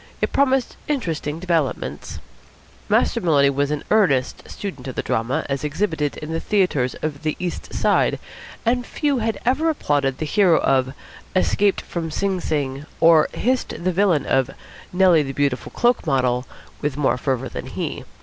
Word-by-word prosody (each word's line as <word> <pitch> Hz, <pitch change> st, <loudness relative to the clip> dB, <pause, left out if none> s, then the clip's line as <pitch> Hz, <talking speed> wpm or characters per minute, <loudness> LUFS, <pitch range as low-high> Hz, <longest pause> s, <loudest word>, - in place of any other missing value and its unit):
It -, -, -1 dB
promised 270 Hz, -2 st, +2 dB
interesting 165 Hz, -, -2 dB
developments. 155 Hz, -, -2 dB, 0.7 s
Master -, -, +2 dB
Maloney 140 Hz, -5 st, +4 dB
was 140 Hz, +1 st, 0 dB
an 150 Hz, -1 st, -2 dB
earnest 160 Hz, -13 st, +2 dB
student 160 Hz, -11 st, -6 dB
of 130 Hz, -, -5 dB
the -, -, -2 dB
drama, 120 Hz, 0 st, -1 dB
as 135 Hz, -1 st, -2 dB
exhibited 150 Hz, -1 st, -1 dB
in 155 Hz, +1 st, -6 dB
the 165 Hz, -, -1 dB
theatres 170 Hz, -13 st, +1 dB
of 150 Hz, -2 st, -3 dB
the 155 Hz, -1 st, -1 dB
East 180 Hz, -1 st, -5 dB
Side, -, -, +2 dB, 0.5 s
and 245 Hz, +2 st, +2 dB
few 285 Hz, 0 st, -1 dB
had 225 Hz, 0 st, -1 dB
ever 290 Hz, +7 st, +2 dB
applauded 145 Hz, -, 0 dB
the 155 Hz, -, -3 dB
hero 175 Hz, +1 st, +4 dB
of 130 Hz, -1 st, +1 dB, 0.4 s
"Escaped 200 Hz, +1 st, +2 dB
from 165 Hz, -2 st, -4 dB
Sing 190 Hz, +3 st, -1 dB
Sing," 140 Hz, -2 st, -2 dB
or 165 Hz, -2 st, +6 dB
hissed 255 Hz, -6 st, -1 dB
the 185 Hz, -, +2 dB
villain 180 Hz, -6 st, +2 dB
of 135 Hz, -1 st, +2 dB, 0.4 s
"Nellie, 180 Hz, -3 st, +5 dB
the 135 Hz, -2 st, -4 dB
Beautiful 140 Hz, -2 st, -1 dB
Cloak 240 Hz, -7 st, +1 dB
Model" 125 Hz, -3 st, +1 dB, 0.3 s
with 145 Hz, -2 st, -2 dB
more 145 Hz, -3 st, +2 dB
fervour 135 Hz, -1 st, -1 dB
than -, -, -6 dB
he. -, -, -4 dB
155 Hz, 160 wpm, -22 LUFS, 135-195 Hz, 0.7 s, or